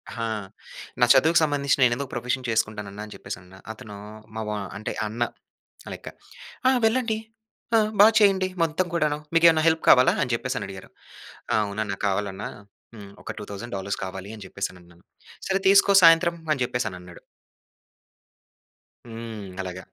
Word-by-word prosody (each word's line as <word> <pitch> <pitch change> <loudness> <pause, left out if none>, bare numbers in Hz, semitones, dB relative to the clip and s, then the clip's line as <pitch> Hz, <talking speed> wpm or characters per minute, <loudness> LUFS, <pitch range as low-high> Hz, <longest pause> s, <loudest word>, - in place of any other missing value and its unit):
హా! 115 -1 -3 0.8
నా 120 - +8
చదువుకు 160 +1 +5
సంబంధించిన 140 -2 +1
నేనెందుకు 125 +3 -1
ప్రొఫెషన్ 125 +1 -2
చేసుకుంటానన్నా 105 -2 -2
అని 105 - -11
చెప్పేసి - - -7
అన్నా. 95 +1 -16 0.2
అతను 105 -2 -11 0.4
మావ 110 -1 -4 0.3
అంటే 110 - -4 0.2
అన్న 115 +3 -2 0.7
లెక్క. - - -11 0.6
"ఆహ్, 260 -1 +4
వెళ్ళండి. 225 -1 +1 0.6
ఆహ్, 215 -1 +2
బా 210 - +10
చేయండి 195 -2 +4 0.2
మొత్తం 165 +3 0
కూడాను. 150 -3 +1 0.2
మీకేమైనా 165 -1 +5
హెల్ప్ 160 0 +2
కావాలా" 125 0 +7
అని 125 - -3
చెప్పేసని 130 +2 -3
అడిగారు. 95 -1 -10 0.6
ఆ! - - +4
అవునన్నా, 100 -1 -3
కావాలన్నా. 100 0 -2 0.5
హ్మ్. 100 -2 -11
ఒక - - -5
2,000 105 +3 -8
డాలర్స్ 100 +1 -4
కావాలి 95 +2 -7
అని 100 - -10
చెప్పేసి 100 - -4
అనన్నాను. 85 -1 -19 0.4
"సరే 195 0 0
తీసుకో 200 0 +6
సాయంత్రం" 170 +1 +6 0.2
అని 140 - -5
చెప్పేసి 125 -2 -2
అనన్నాడు. 90 -1 -12 1.9
హ్మ్. 115 -2 -7 0.2
అలాగ. 90 -1 -6
120 Hz, 140 wpm, -25 LUFS, 100-160 Hz, 1.9 s, బా